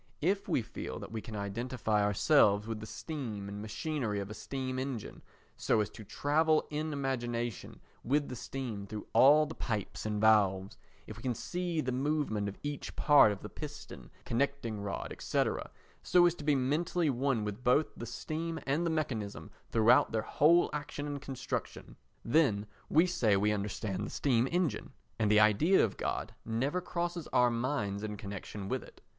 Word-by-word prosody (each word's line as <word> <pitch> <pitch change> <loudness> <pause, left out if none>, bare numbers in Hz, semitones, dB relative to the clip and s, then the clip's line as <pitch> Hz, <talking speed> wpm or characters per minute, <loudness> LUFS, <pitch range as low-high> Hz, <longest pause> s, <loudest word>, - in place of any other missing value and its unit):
If 195 +4 +1
we 120 - +1
feel - - -6
that - - -8
we 110 -1 -4
can 110 - -8
identify 105 +1 -1
ourselves 105 0 +4
with 110 -1 -4
the 110 - -8
steam 115 -12 -5
and 100 +1 -6
machinery 110 0 -2
of 100 +1 -5
a - - -4
steam 130 +2 -4
engine, 130 -4 -5 0.4
so - - +2
as 105 - -1
to 110 - -10
travel 150 +9 +2
in 155 +1 -2
imagination 120 -5 -3 0.2
with 145 +3 +1
the 125 - -6
steam 115 -5 -5
through 105 +1 -6
all 150 +3 +7
the 155 - -7
pipes 110 -9 -3
and 105 -1 -1
valves, 100 -3 +3 0.3
if 110 - -9
we - - -10
can 125 -1 -1
see 175 +3 -2
the 130 - -2
movement 130 -6 0
of 100 - -9
each 145 -1 -5
part 145 -7 +6
of 100 - -6
the - - -5
piston, 150 +8 -9 0.2
connecting 120 -3 -1
rod, 100 -1 -4
&c., - - +1 0.6
so 175 -1 +5
as 175 - +4
to 160 - -10
be 150 -1 +3
mentally 155 +5 +1
one 130 -3 0
with 105 +4 -5
both 130 +5 +3
the 115 - -7
steam 165 +5 -4
and 150 +5 +1
the - - +1
mechanism 125 -11 -3 0.2
throughout 120 +5 +5
their 110 -1 0
whole 170 +4 +4
action 145 -1 -4
and 145 -1 -4
construction, 135 -3 -5 0.3
then 115 -7 +3 0.2
we 160 +3 +5
say 115 - +2
we 105 +2 +2
understand 100 -1 -2
the - - -4
steam 125 -3 +1
engine, 170 -11 -1 0.3
and 105 - +2
the 105 0 +6
idea 110 - +5
of 105 - -5
God - - -3
never 135 +10 -1
crosses 175 -1 -3
our 125 -1 +3
minds 115 -5 -1
in 105 -1 -4
connection 100 -1 -7
with - - -1
it. - - -15
125 Hz, 180 wpm, -32 LUFS, 105-150 Hz, 0.6 s, all